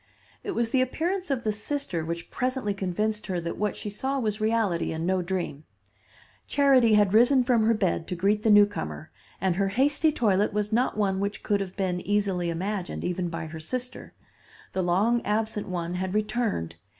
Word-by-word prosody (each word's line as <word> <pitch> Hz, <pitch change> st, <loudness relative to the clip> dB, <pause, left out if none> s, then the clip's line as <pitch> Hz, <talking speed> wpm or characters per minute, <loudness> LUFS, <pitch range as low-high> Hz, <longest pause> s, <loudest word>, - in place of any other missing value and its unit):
It 400 Hz, -, -4 dB
was 235 Hz, -1 st, 0 dB
the 260 Hz, -, +3 dB
appearance 350 Hz, +8 st, -1 dB
of 265 Hz, -4 st, -1 dB
the 215 Hz, -, +1 dB
sister 210 Hz, -, -3 dB
which 170 Hz, +1 st, -5 dB
presently 255 Hz, -5 st, -1 dB
convinced 210 Hz, +3 st, -2 dB
her 185 Hz, -3 st, -1 dB
that 170 Hz, 0 st, -4 dB
what 210 Hz, -1 st, -1 dB
she 210 Hz, -, -5 dB
saw 265 Hz, +7 st, -2 dB
was 215 Hz, -4 st, -2 dB
reality 215 Hz, -6 st, +1 dB
and 160 Hz, +1 st, -3 dB
no 185 Hz, 0 st, +1 dB
dream. 175 Hz, -5 st, -3 dB, 0.8 s
Charity 265 Hz, -6 st, +4 dB
had 205 Hz, -2 st, +3 dB
risen 245 Hz, +4 st, +5 dB
from 245 Hz, -2 st, +3 dB
her 225 Hz, +1 st, +3 dB
bed 185 Hz, -5 st, 0 dB
to 180 Hz, -, -3 dB
greet 200 Hz, +4 st, +1 dB
the 220 Hz, -, +1 dB
newcomer, 205 Hz, -, +3 dB, 0.3 s
and 185 Hz, -1 st, 0 dB
her 200 Hz, 0 st, +2 dB
hasty 280 Hz, +9 st, +2 dB
toilet 210 Hz, -6 st, +1 dB
was 210 Hz, +1 st, -1 dB
not 245 Hz, -1 st, +1 dB
one 195 Hz, -2 st, +1 dB
which 200 Hz, +1 st, -3 dB
could 205 Hz, -2 st, +1 dB
have 190 Hz, -1 st, -5 dB
been 180 Hz, -2 st, -1 dB
easily 195 Hz, -3 st, 0 dB
imagine, 185 Hz, +2 st, -3 dB
even 175 Hz, 0 st, -2 dB
by 165 Hz, -1 st, -5 dB
her 160 Hz, 0 st, -8 dB
sister. 250 Hz, +10 st, -6 dB, 0.6 s
The 190 Hz, -, 0 dB
long 200 Hz, +7 st, +2 dB
absent 215 Hz, 0 st, -1 dB
one 175 Hz, -2 st, -3 dB
had 185 Hz, +2 st, -3 dB
returned. 215 Hz, -, -1 dB
205 Hz, 185 wpm, -26 LUFS, 180-230 Hz, 0.8 s, risen